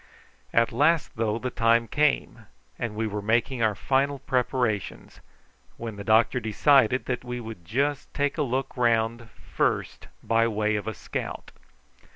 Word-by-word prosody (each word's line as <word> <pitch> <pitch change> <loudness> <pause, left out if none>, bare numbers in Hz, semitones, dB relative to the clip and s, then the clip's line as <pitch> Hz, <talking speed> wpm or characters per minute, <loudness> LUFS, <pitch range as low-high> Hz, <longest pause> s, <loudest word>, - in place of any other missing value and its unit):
At 115 -1 +3
last, 150 +6 +2
though, 110 -1 0
the 125 +2 -4
time 115 0 +2
came, 150 +5 0 0.3
and 115 -3 -3
we 110 +1 -1
were 105 -1 -3
making 115 +4 0
our 110 -2 +2
final 140 +6 +1
preparations, 125 -5 -2 0.6
when 115 -2 -6
the 100 - -7
doctor 110 +4 +3
decided 125 +3 +3
that 125 -1 -3
we 125 0 -5
would 110 -6 -8
just 140 +10 -1
take 145 +2 -1
a - - +3
look 135 -1 -2
round 115 -1 +1
first - - -2 0.2
by 115 0 +2
way 110 -1 0
of 105 0 -3
a 110 - -3
scout. - - -6
115 Hz, 155 wpm, -26 LUFS, 110-130 Hz, 0.6 s, At